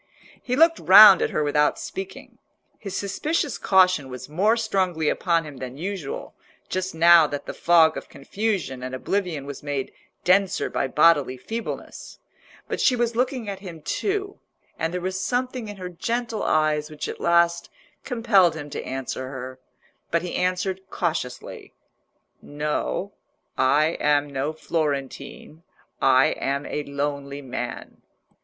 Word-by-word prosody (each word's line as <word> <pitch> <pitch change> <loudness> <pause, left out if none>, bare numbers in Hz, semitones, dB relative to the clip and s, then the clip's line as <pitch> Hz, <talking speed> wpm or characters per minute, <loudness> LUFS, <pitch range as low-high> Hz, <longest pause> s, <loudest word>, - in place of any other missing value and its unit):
He 250 - -2
looked 330 +3 +4
round 195 0 +9
at - - +1
her 150 - -1
without 150 0 +2
speaking. 190 0 -8 0.4
His 195 -3 -5
suspicious 285 - -2
caution 185 -7 +3
was 125 0 -8
more 200 +9 +2
strongly 185 -8 0
upon 170 -2 +1
him 150 -3 -10
than 130 0 -7
usual, 180 -3 -5 0.4
just 185 -1 -3
now 170 -1 +7
that 145 -1 -5
the - - -6
fog 165 -2 +4
of - - -8
confusion 190 - -3
and 130 0 -5
oblivion 170 -1 -2
was 140 -1 -8
made 145 -2 -4 0.3
denser 190 +1 +2
by - - -1
bodily 145 -2 +3
feebleness. 225 - -7 0.5
But - - -3
she 255 - +4
was 235 -1 -1
looking 250 -1 -1
at 195 -1 -5
him 170 -6 -10
too, 400 - -2 0.4
and 165 0 -1
there 180 - -3
was 185 +1 -3
something 250 0 -2
in 205 -1 -8
her 180 -1 -6
gentle 230 +5 -3
eyes 155 -1 +1
which 155 -1 -6
at - - -7
last 170 0 +2 0.3
compelled 225 - +3
him 145 -2 -8
to - - -5
answer 130 0 -5
her. 130 -1 -8 0.5
But 170 0 0
he 180 - -5
answered 185 +1 -1
cautiously— 160 -8 -4 0.7
"No, 150 +6 -3 0.4
I 150 +5 +2
am 145 -1 +1
no 140 +3 -1
Florentine; 150 -1 -4 0.4
I 130 0 +5
am 140 +1 -2
a 150 - -3
lonely 140 0 -4
man." 130 - -6
170 Hz, 145 wpm, -24 LUFS, 145-195 Hz, 0.7 s, round